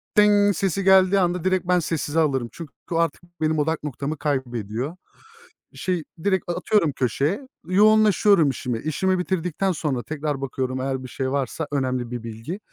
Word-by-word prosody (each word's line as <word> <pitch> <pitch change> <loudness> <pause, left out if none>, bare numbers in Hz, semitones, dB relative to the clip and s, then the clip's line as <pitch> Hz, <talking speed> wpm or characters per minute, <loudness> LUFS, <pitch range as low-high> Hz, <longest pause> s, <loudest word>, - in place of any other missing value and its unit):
"tıng" 205 -2 +5
sesi 195 0 -1
geldiği 190 0 +5
anda 180 -2 0
direkt 185 -1 0
ben 180 0 +4
sessize 160 -1 -1
alırım. 135 -6 +1
Çünkü 165 -4 -9 0.2
o - - 0
artık 165 -1 0 0.2
benim 155 0 +1
odak 160 +1 0
noktamı 150 +1 -4
kaybediyor. 125 - -3 0.8
Şey 180 -3 -2 0.2
direkt 190 -3 0
a - - +1
atıyorum 205 -9 +2
köşeye. 140 - -1 0.2
Yoğunlaşıyorum 205 -3 +5
işime. 125 -2 -3
İşimi 185 - 0
bitirdikten 180 +1 -1
sonra 145 -7 -2
tekrar 150 -2 -3
bakıyorum 130 -1 -3
eğer 130 0 -2
bir - - -7
şey 130 +1 -3
varsa 140 +3 -2
önemli 130 -3 -1
bir 120 -2 -5
bilgi. 115 - -6
155 Hz, 160 wpm, -23 LUFS, 130-185 Hz, 0.8 s, tıng